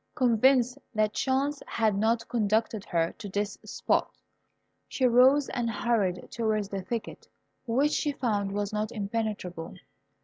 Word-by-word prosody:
Convinced 250 +1 +3 0.2
that 215 0 +2
chance 275 +2 0
had 220 -3 +1
not 225 +3 +1
conducted 220 -2 0
her 165 -1 0
to 205 - -6
this 205 +1 -2
spot, - - -1 0.7
she 260 - 0
rose 260 +4 +5
and 240 -2 -1
hurried 205 -5 0
towards 215 -3 -1
the 195 -2 -3
thicket, 230 +4 -5 0.4
which 270 +6 +2
she 295 - 0
found 210 -7 -1
was 205 +1 -2
not 210 0 -1
impenetrable. 200 -6 -4
220 Hz, 135 wpm, -28 LUFS, 205-245 Hz, 0.7 s, rose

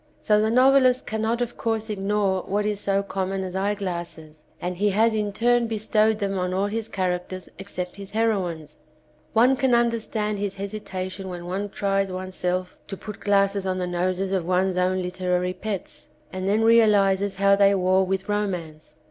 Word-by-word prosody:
So 210 0 +4
the 215 - +2
novelist 255 +1 +4
cannot 220 +2 -1
of 240 0 -7
course 225 -1 -1
ignore 200 -2 0
what 205 +1 0
is 210 -1 -1
so 200 -1 0
common 195 -1 -3
as 185 0 -6
eyeglasses 175 -6 -4
and 180 0 -3
he 205 +2 +2
has 220 +3 +3
in 210 -1 -1
turn 240 +2 +2
bestowed 220 0 +1
them 195 -2 -2
on 180 0 -1
all 195 +1 +1
his 220 +2 -3
characters 185 0 -3
except 180 -2 -6
his 200 -1 -8
hero 220 -4 +1
ines. 155 -2 -10 0.6
One 245 +4 +5
can 260 -2 +2
understand 225 -3 0
his 200 -1 -3
hesitation 195 -2 -5
when 175 -1 -7
one 195 +3 -3
tries 195 -1 0
oneself 185 0 -3
to 195 - -6
put 210 +1 -8
glasses 200 -1 +1
on 185 0 -1
the 180 - -1
noses 180 +2 -1
of 190 -3 0
one's 185 +2 +1
own 185 0 +1
literary 180 0 -1
pets, 205 -1 -6 0.2
and 185 0 -3
then 210 +3 +2
realises 205 -4 +4
how 200 +1 +4
they 200 0 +4
war 185 0 +3
with 190 +1 -2
romance. 175 -8 -3
195 Hz, 175 wpm, -24 LUFS, 185-215 Hz, 0.6 s, One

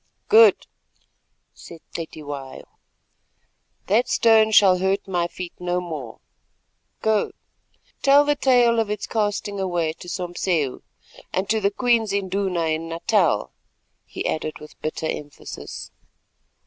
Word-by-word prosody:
"Good," 450 +1 +6 0.9
said 170 -2 -13
Cetywayo, 145 -5 -7 1.2
"that 225 +6 +2
stone 220 -1 +5
shall 195 -4 +5
hurt 190 +2 0
my 175 -2 0
feet 175 0 -8
no 180 0 -1
more. 155 -10 -7 0.9
Go, 220 -1 +1 0.7
tell 280 +1 +6
the 295 0 +2
tale 245 -4 +3
of 220 -2 0
its 210 -1 -3
casting 205 -2 -2
away 175 -4 -1
to 175 +2 -11
Sompseu 175 -5 -2 0.5
and 190 +1 -1
to 220 -1 +1
the 200 - +3
Queen's 225 -1 +1
Induna 190 -3 -1
in 160 +1 -2
Natal," 165 - +1 0.6
he - - -6
added 155 -1 -2
with 150 0 -14
bitter 155 +1 -3
emphasis. 145 -2 -7
185 Hz, 120 wpm, -23 LUFS, 165-215 Hz, 1.2 s, Good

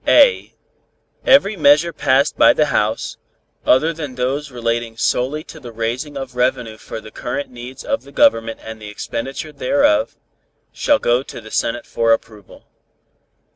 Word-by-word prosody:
(a) - - +5 0.8
Every 240 -6 +5
measure 150 +1 +4
passed 140 0 +2
by - - +6
the 150 - +2
House, 110 +1 -1 0.5
other 155 +6 +4
than 150 -5 -6
those 135 +4 -2
relating 115 -2 -3
solely 135 +7 0
to 160 - -12
the 120 -5 -10
raising 120 +6 -3
of 135 -2 -7
revenue 125 -3 0
for - - -7
the 110 0 -12
current 130 +3 -5
needs 125 +2 -9
of 275 - -1
the 140 - -16
Government 115 -11 +2
and 110 0 -9
the 105 - -8
expenditure 135 +8 -5
thereof, 280 - +1 0.6
shall 290 - +2
go 120 - +1
to 135 - -9
the 110 -1 -12
Senate 120 +1 -1
for 115 0 +2
approval. 110 -3 -7
130 Hz, 155 wpm, -19 LUFS, 115-150 Hz, 0.8 s, by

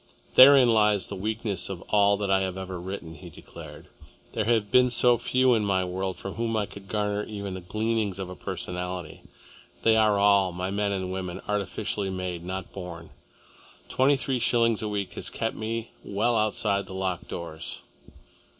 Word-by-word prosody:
"Therein 130 -3 +8
lies 105 -3 +3
the - - -6
weakness 105 -1 -2
of 95 -3 -6
all 100 -1 +4
that 100 -1 -2
I 95 0 +4
have 95 -1 -2
ever 95 -1 -5
written," 90 -3 -6
he 75 - -11
declared. - - -12 0.5
"There 110 - -1
have 110 -3 +1
been 125 0 +5
so 120 -1 +4
few 130 +1 +3
in 110 -2 +2
my 95 -2 +1
world 95 +1 -3
from 95 - -6
whom 115 -1 -1
I 105 - +1
could 100 -1 -12
garner 105 0 -1
even 100 -3 -6
the 95 - -6
gleanings 110 +1 -1
of 95 -1 -4
a 90 - -8
personality. 90 -3 -5 0.6
They 115 -1 +5
are 110 -2 +4
all, 100 -2 +4
my 90 +2 -3
men 100 0 0
and 95 -1 -3
women, 90 -2 -4
artificially 100 0 -2
made, 90 -2 -4
not 95 +1 -5
born. 85 -3 -8 0.8
Twenty 135 +2 +3
three 130 -1 -1
shillings 115 -2 +2
a 110 - -2
week 100 -3 -3
has - - -4
kept 115 - -3
me 115 +1 -4
well 110 +4 0
outside 105 -2 0
the 95 - -8
locked 95 -2 -3
doors." 80 -2 -7
100 Hz, 180 wpm, -26 LUFS, 95-110 Hz, 0.8 s, Therein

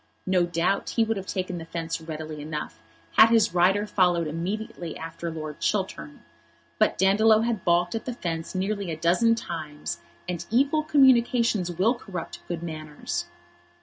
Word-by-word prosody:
No 180 -2 +2
doubt 170 +3 0
he 230 - +5
would 225 0 0
have 195 0 -6
taken 185 -2 -3
the 165 - -8
fence 165 0 -4
readily 155 -1 -6
enough 150 - -5 0.4
had 220 - +9
his 225 -5 +3
rider 190 +4 +3
followed 180 -5 +2
immediately 170 +2 -4
after 165 +1 -6
Lord 155 -2 -6
Chiltern; 75 -1 -2 0.6
but - - +3
Dandolo 215 +4 +5
had 230 -5 -1
baulked 175 0 +2
at 225 - -4
the 250 - -3
fence 165 -3 -4
nearly 200 0 -1
a 160 - -3
dozen 180 +8 +3
times, 150 - -5 0.3
and 175 -1 -3
evil 275 +7 +3
communications 240 - +3
will 190 +8 +2
corrupt 195 -8 -7
good 170 -1 -4
manners. 150 - -5
175 Hz, 155 wpm, -26 LUFS, 165-215 Hz, 0.6 s, had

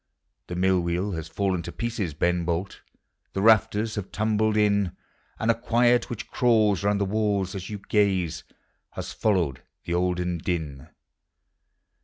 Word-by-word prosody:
The 90 - -5
mill 95 +1 +3
wheel 85 +4 -1
has 80 -4 -4
fallen 95 -3 -1
to 85 - -7
pieces, 110 -9 -3
Beu 85 +2 +1
Bolt, 85 +3 -3 0.5
The 95 - -1
rafters 110 0 +4
have 100 -3 -5
tumbled 110 0 +1
in, 100 -3 +2 0.4
And 115 +1 +2
a - - +3
quiet 120 +1 +2
which 120 - -6
crawls 110 -6 +3
round 100 0 +2
the 100 - +1
walls 100 -2 0
as 95 -2 -6
you 105 - -4
gaze 95 -6 +1 0.5
lias - - -5
followed 85 -11 0 0.2
the 85 - -3
olden 90 -1 0
din. 80 -6 -3
100 Hz, 150 wpm, -26 LUFS, 90-110 Hz, 0.5 s, rafters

